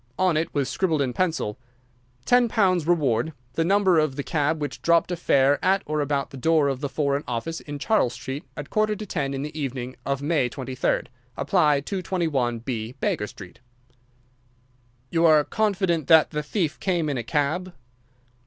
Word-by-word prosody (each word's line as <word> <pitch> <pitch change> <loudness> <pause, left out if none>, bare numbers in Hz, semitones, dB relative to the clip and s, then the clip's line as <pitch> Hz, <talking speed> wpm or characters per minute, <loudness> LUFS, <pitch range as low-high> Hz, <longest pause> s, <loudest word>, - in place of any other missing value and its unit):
On 185 -3 +2
it 160 +2 0
was 140 -3 0
scribbled 165 -5 0
in 125 -2 -2
pencil: 160 -9 -1 0.7
"£10 205 -7 +3
Reward.—The 145 -3 0
number 190 -1 +3
of 155 -3 0
the 140 - -3
cab 155 +1 0
which 145 -1 -5
dropped 170 +1 +3
a - - 0
fare 140 -4 +2
at 195 +1 +2
or 150 0 -1
about 140 -1 -1
the 135 - -9
door 155 +1 +3
of 135 -2 -2
the 145 - -2
Foreign 140 0 0
Office 125 +8 -3
in 145 -1 -7
Charles 145 - +1
Street 135 +3 -6
at 145 0 -7
quarter 215 0 +1
to 215 - -7
ten 140 -7 -2
in 135 - -3
the 150 +1 -7
evening 130 -4 -4
of 140 -1 -1
May 145 -5 +1
23rd. 130 0 -2 0.3
Apply 150 -8 +2
221B, 130 - -2
Baker 105 - -1
Street." 95 -3 -12 1.5
"You 165 -1 +2
are 155 -2 +6
confident 190 -6 0
that 160 -2 +6
the 150 - -2
thief 160 +1 -2
came 175 -5 0
in 140 -4 -1
a - - -3
cab?" 155 +8 -1
150 Hz, 170 wpm, -24 LUFS, 135-175 Hz, 1.5 s, are